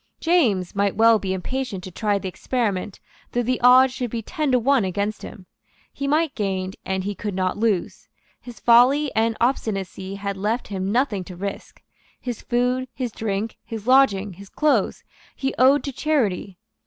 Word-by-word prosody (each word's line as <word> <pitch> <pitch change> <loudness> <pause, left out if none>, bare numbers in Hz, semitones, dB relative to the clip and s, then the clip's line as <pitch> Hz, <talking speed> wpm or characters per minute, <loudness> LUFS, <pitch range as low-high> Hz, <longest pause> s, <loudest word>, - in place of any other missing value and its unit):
James 240 - +2
might 200 -1 0
well 225 +1 +5
be 190 -2 -3
impatient 195 +1 -3
to 185 - -8
try 205 +2 0
the 195 - -5
experiment, 205 -1 -2 0.3
though 245 - +1
the 250 +1 -1
odds 255 +1 +6
should 255 -2 -3
be 230 0 -4
ten 305 - -2
to 255 - +4
one 260 0 +3
against 200 +3 -2
him. 185 - -10 0.5
He 280 - -4
might 305 +1 +1
gain; 190 -3 -2
and 190 0 -2
he 205 +2 -3
could 205 -1 -5
not 185 -1 0
lose. 210 -4 -1 0.3
His 245 -2 -11
folly 255 +5 +5
and 225 0 +1
obstinacy 195 -6 -2
had 200 0 -4
left 215 +5 -2
him 195 -1 -2
nothing 230 -5 0
to 180 - -9
risk. 200 +2 -7 0.4
His 245 -3 -5
food, 250 +1 0
his 250 -3 -3
drink, 215 0 -3
his 225 -3 -7
lodging, 220 -7 +4
his 195 +2 -13
clothes, 305 -1 +1 0.3
he 270 0 -2
owed 270 +3 +5
to 280 - -3
charity. 225 - -1
220 Hz, 175 wpm, -23 LUFS, 195-255 Hz, 0.5 s, odds